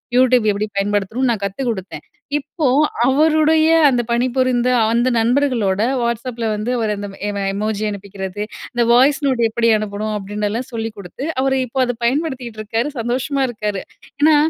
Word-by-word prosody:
YouTube 250 -2 +4
எப்படி 205 +1 -1
பயன்படுத்தணும்னு 205 +5 0
நான் 215 -4 -3
கத்து 200 +7 -5
குடுத்தேன். 195 -4 -5 0.4
இப்போ 295 +3 -4 0.4
அவருடைய 315 +3 +4 0.2
அந்த 245 -2 +1
பணிபுரிந்த 250 0 +1 0.2
அந்த 240 +2 +2
நண்பர்களோட 230 -5 +1 0.2
WhatsAppல 235 -1 -2
வந்து 215 +4 -2
அவர் 220 -2 0
அந்த 205 0 -5 0.2
எம் 200 -1 -3
எமோஜி 210 +1 -2
அனுப்பிக்கிறது 200 -1 -6 0.3
"இந்த 240 -1 +2
வாய்ஸ் 270 +4 +4
நோட் 255 -3 +1
எப்படி 230 +1 +1
அனுப்பணும்?" 215 0 -3
அப்படினல்லாம் 210 +5 -3
சொல்லி 225 0 -3
குடுத்து, 200 +7 -7 0.2
அவர் 265 0 +1
இப்போ 255 +2 -4
அத 245 -1 -2
பயன்படுத்திட்ருக்காரு. 240 -4 -2
சந்தோஷமா 260 +4 -1
இருக்காரு. 210 -4 -3 0.4
ஏன்னா, 310 +1 +6
235 Hz, 140 wpm, -19 LUFS, 210-260 Hz, 0.4 s, ஏன்னா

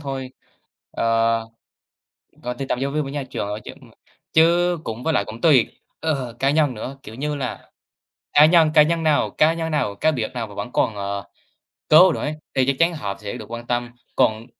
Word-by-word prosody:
thôi, 135 -3 -5 0.6
ờ, 115 0 +1 1.0
tùy 125 +3 -4
tâm 125 - 0
giáo 135 +1 -1
viên 150 +1 0
với 135 - -6
nhà 145 -1 -3
trường, 125 -5 -5
ơ, 105 +1 -4
chứ - - -8
ừm, - - -17 0.4
chứ 175 +2 +4
cũng 115 -1 -6
với 160 - 0
lại 100 - +1
cũng 110 +2 -9
tùy, 140 -8 +5 0.3
ờ, 135 -7 -2
cá 135 - +2
nhân 145 -2 +2
nữa, 130 +4 -7
kiểu 110 - -10
như 150 +4 -3
là, 135 -3 -5 0.6
cá 150 - +7
nhân 160 -1 +5
cá 155 - +8
nhân 165 +2 0
nào 155 -2 +2
cá 155 +1 +3
nhân 165 -1 -3
nào 140 -10 -1
cá 155 +10 +2
biệt 120 -8 -3
nào 120 -2 -3
mà 100 - -13
vẫn 125 - -6
còn, 110 - +1
ờ, 100 0 -4 0.6
cố 175 +4 +7
đổi - - -4
ấy, 150 - -2 0.2
thì 130 -1 +2
chắc 140 0 +1
chắn 170 +1 +3
họ 100 -11 -4
sẽ 105 -1 -5
được - - -9
quan 120 0 -7
tâm, 120 0 -1 0.3
còn 110 +1 +2
135 Hz, 215 wpm, -22 LUFS, 115-155 Hz, 1.0 s, cá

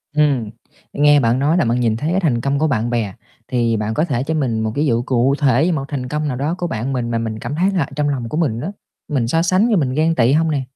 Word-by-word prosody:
Ừm, 140 -8 +2 0.4
nghe 145 0 +5
bạn 120 0 +2
nói 155 +5 +2
là 170 - +2
bạn 120 +1 +1
nhìn 115 -2 +1
thấy 150 +7 -2
cái 185 - +2
thành 135 -10 0
công 140 +2 0
của 155 - +2
bạn 120 -4 0
bè, 115 -5 -1 0.3
thì 120 -3 0
bạn 105 +1 -2
có 155 +7 +1
thể 130 -6 -1
cho 155 +4 -2
mình 130 -8 0
một 110 0 -1
cái 150 +2 +1
dụ 120 -4 +1
cụ 130 +2 +1
thể 145 +5 +3
một 140 -4 -2
thành 135 -4 -4
công 150 +1 -2
nào 130 -4 -3
đó 150 +6 -1
của 175 -1 -2
bạn 125 +1 -3
mình 120 -2 -2
mà 115 - 0
mình 110 -1 -3
cảm 145 - -5
thấy 185 +5 +2
là 170 -8 0
trong 150 -1 0
lòng 125 -5 -3
của 150 - -3
mình 140 -9 0
á, 190 - -4 0.4
mình 130 -6 -1
so 165 +7 +1
sánh 185 +6 +2
với 225 - +2
mình 135 -6 0
ghen 160 +3 +1
tị 120 0 +3
không 160 +1 +2
nè? 140 -3 -1
140 Hz, 290 wpm, -19 LUFS, 120-155 Hz, 0.4 s, nghe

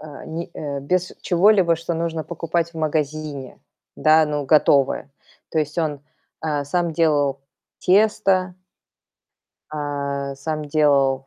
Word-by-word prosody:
э, 150 -3 -10
ни 170 +2 -5
э, 140 -2 -4
без 180 +6 -1
чего-либо, 185 -1 +4
что 170 +1 -4
нужно 165 -1 -2
покупать 170 0 -2
в 165 - -8
магазине, 150 -3 -3 0.4
да? 155 0 +5
Ну, 150 -1 -2
готовое. 140 -2 +3 0.4
То - - -1
есть 155 0 -2
он, 150 -3 -1 0.4
э, 145 -2 -1
сам 170 +3 -1
делал 145 -4 +1 0.4
тесто 195 -2 +2 1.2
э, 140 -2 -3
сам 155 +1 -4
делал 140 -3 +2
155 Hz, 125 wpm, -22 LUFS, 145-170 Hz, 1.2 s, да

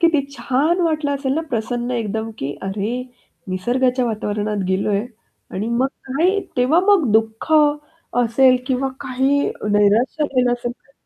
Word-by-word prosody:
किती 330 -4 +4
छान 295 +8 +1
वाटलं 305 -3 0
असेल 270 -1 -1
ना 320 - -1
प्रसन्न 240 +1 -2
एकदम 225 -2 -2
की 140 +1 -2
अरे! 195 +2 -2 0.6
निसर्गाच्या 250 +7 +1
वातावरणात 210 -2 -2
गेलोय 200 +3 0 0.5
आणि 210 +4 -3
मग 235 +3 +1 0.2
काय 345 +10 +2 0.2
तेव्हा 260 +8 +4
मग 380 - +4
दुःख 220 +6 0 0.7
असेल 255 +2 +4
किंवा 265 0 0
काही 265 +3 +1 0.3
नैराश्य 210 +8 +3
झालं 255 -3 +1
असेल 240 0 -3
तर 275 +3 -29
245 Hz, 135 wpm, -20 LUFS, 220-275 Hz, 0.7 s, किती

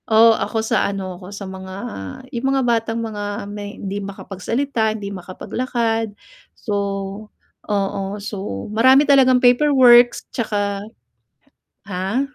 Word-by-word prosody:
Oo 225 +1 +7
ako 220 0 -2
sa - - +1
ano 190 -2 -5
ko, 180 - -10
sa 200 0 -7
mga 190 0 -8 0.6
yung 240 +2 -1
mga 270 -1 +1
batang 230 -1 0
mga 205 -2 -4
may 205 0 -7
hindi 200 +1 -4
makapagsalita, 220 +4 -2
hindi 200 -1 -6
makapaglakad. 225 +3 -3 0.4
So 210 - -4 1.0
oo 200 -1 0 0.2
so 200 - -5
marami 260 +6 +6
talagang 265 -3 +5
paperworks 245 -2 +5
'tsaka 205 -3 -1 1.1
ha? 190 +7 -1
220 Hz, 115 wpm, -20 LUFS, 200-240 Hz, 1.1 s, Oo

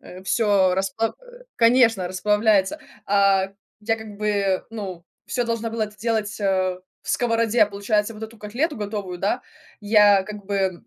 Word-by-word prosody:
э, 185 +1 -12
всё 200 -5 +3
расплав 195 +4 -1
э, - - -16
конечно, 230 -5 +4
расплавляется. 210 +5 +2 0.3
А, 195 -1 +3 0.3
я 225 +1 0
как 220 -2 -10
бы, 200 -3 0
ну, 190 -6 -7 0.2
всё 245 - -1
должна 230 -1 -2
была 225 -1 -1
это 210 - -11
сделать, 215 0 -2
э, 185 -2 +1 0.2
в - - -14
сковороде, 230 -1 +2
получается, 210 +2 -1
вот 215 - -11
эту 220 +1 -8
котлету 250 +10 -2
готовую, 205 -4 -4
да, 210 +7 0 0.4
я 205 -2 +5
как 210 0 -9
бы, 200 +1 -3
м, 190 +1 -1
210 Hz, 160 wpm, -23 LUFS, 195-225 Hz, 0.4 s, я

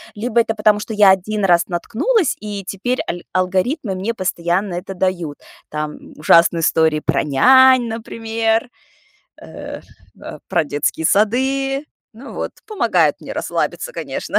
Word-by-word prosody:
Либо 235 +2 +1
это 225 -1 -2
потому, 210 -1 +3
что 220 +1 -6
я 205 -2 +6
1 200 +2 0
раз 175 -2 +3
наткнулась, 275 - 0
и 205 -2 -6
теперь 230 +7 -2
аль 175 0 -4
алгоритмы 190 - 0
мне 195 +5 -2
постоянно 180 0 -1
это 185 +2 -6
дают. 180 -5 -2 0.3
Там 150 0 -6
ужасные 165 +2 +4
истории 160 -1 +2
про - - 0
нянь, 255 - +5
например, 225 0 -2 0.7
э, - - -9 0.4
а, - - -9
про 160 - +1
детские 145 +2 -1
сады. 270 +6 +1 0.3
Ну 250 +5 -11
вот, - - -4 0.2
помогают 430 -2 +1
мне - - -8
расслабиться, - - -3
конечно. - - -3
210 Hz, 140 wpm, -19 LUFS, 175-235 Hz, 0.7 s, я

